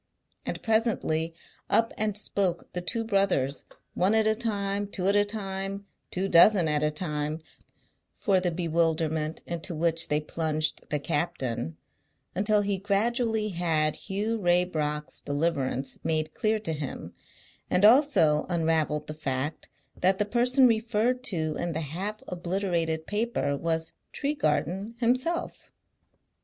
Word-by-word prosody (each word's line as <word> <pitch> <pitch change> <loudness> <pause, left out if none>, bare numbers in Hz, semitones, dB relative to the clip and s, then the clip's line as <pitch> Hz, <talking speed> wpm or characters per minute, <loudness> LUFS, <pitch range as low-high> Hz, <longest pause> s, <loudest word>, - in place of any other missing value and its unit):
And - - -2
presently 215 -8 0 0.3
up 225 +2 +3
and 210 -1 -1
spoke 195 -4 -1
the 180 - -2
two 225 +6 -2
brothers, 195 - +1 0.3
one 190 +5 +2
at 220 -1 +4
a 220 - +4
time, 205 -3 -1
two 190 -2 -3
at 200 - +4
a 205 - +6
time, 195 -1 -4 0.2
two 190 +2 -2
dozen 175 0 +6
at 150 -1 +1
a 150 - +2
time 150 -1 -3 0.8
for 195 -4 +2
the 180 -1 0
bewilderment 160 -2 0
into 170 0 -4
which 165 +1 +1
they 150 - +1
plunged 155 0 -2
the 150 - +1
captain, 135 - -2 0.6
until 210 +2 +2
he 200 -1 -1
gradually 220 +2 0
had 165 -4 +1
Hugh 215 +3 -2
Raybrock's 170 -5 0
deliverance 140 -3 -1
made 155 -1 0
clear 215 0 +1
to 165 -6 -2
him, 145 -3 -6 0.6
and 185 - +4
also 220 - +5
unravelled 160 -3 +1
the 155 - -5
fact 145 0 -3 0.3
that 190 +1 +2
the 210 - +1
person 250 +4 +3
referred 235 +2 +1
to 160 - -1
in 175 -1 -2
the 160 - -2
half 190 +9 -5
obliterated 175 -3 -1
paper 210 - -1
was 160 +2 -2 0.2
Tregarthen 195 - -1
himself. 255 +8 -1
180 Hz, 135 wpm, -27 LUFS, 155-210 Hz, 0.8 s, a